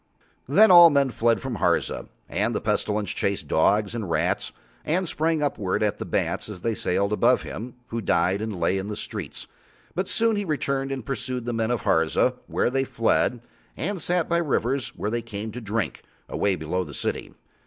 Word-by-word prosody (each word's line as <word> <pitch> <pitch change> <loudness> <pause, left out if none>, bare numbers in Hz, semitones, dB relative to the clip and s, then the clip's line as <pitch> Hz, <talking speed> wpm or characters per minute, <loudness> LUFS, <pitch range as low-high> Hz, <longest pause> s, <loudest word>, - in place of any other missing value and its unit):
Then 210 +9 +6
all 175 -1 +10
men 140 -3 +2
fled 115 0 +1
from 130 -4 -4
Harza, - - 0 0.2
and - - 0
the - - +1
Pestilence 105 -1 0
chased 100 -6 -1
dogs 100 +8 +2
and 110 -6 -4
rats - - 0 0.3
and 180 +4 0
sprang 160 0 0
upward 105 -9 -1
at 105 - 0
the - - -4
bats - - -1
as 95 -4 -8
they 115 - 0
sailed 100 0 0
above 120 +4 +3
him, 120 +3 -7
who 115 0 -3
died 95 +1 +1
and 110 -4 -4
lay 95 +2 +1
in 95 - -5
the 105 - -4
streets. - - -6 0.5
But 185 +1 -2
soon 225 -1 +2
he 205 - 0
returned 140 -5 -1
and 130 -4 -4
pursued 125 -1 -3
the 120 - -2
men 115 0 0
of 120 -3 0
Harza 80 -1 +2
where - - 0
they 135 +1 +1
fled, 120 -1 +1 0.4
and 190 +2 -3
sat 175 0 +1
by 170 - +1
rivers 135 -5 0
where 105 - -3
they 120 0 -1
came 110 -1 -6
to 125 +3 -7
drink, 110 0 -2 0.3
away 100 -2 0
below 85 +3 -2
the 75 -5 -9
city. - - -3
115 Hz, 195 wpm, -25 LUFS, 105-140 Hz, 0.5 s, all